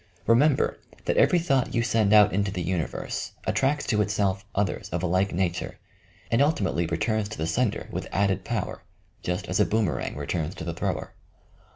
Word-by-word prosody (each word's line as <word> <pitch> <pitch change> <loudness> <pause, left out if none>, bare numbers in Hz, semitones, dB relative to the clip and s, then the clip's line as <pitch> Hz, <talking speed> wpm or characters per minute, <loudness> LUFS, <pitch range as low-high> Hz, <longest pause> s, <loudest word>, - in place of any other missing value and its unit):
Remember 130 +5 +3 0.3
that - - +1
every 180 - +5
thought 135 -7 +1
you 115 - +2
send 110 -3 +2
out 105 -1 +7
into 100 +1 +1
the 90 -3 -3
universe 85 -2 -3
attracts 140 +2 +1
to 105 -1 +2
itself 100 -2 0
others 100 0 -1
of 85 +1 -3
a - - +2
like 95 +3 +1
nature, 90 0 -2 0.5
and 115 +3 +3
ultimately 100 - +1
returns 105 +6 0
to 110 - -7
the 80 - -1
sender 115 +6 0
with - - -4
added 100 -1 +1
power, - - -3 0.2
— - - -38
just 90 0 -3
as 90 - 0
a - - +6
boomerang 110 -4 0
re 70 - -5
turns 80 0 -2
to - - -7
the - - -3
thrower. - - -3
100 Hz, 190 wpm, -26 LUFS, 90-115 Hz, 0.5 s, out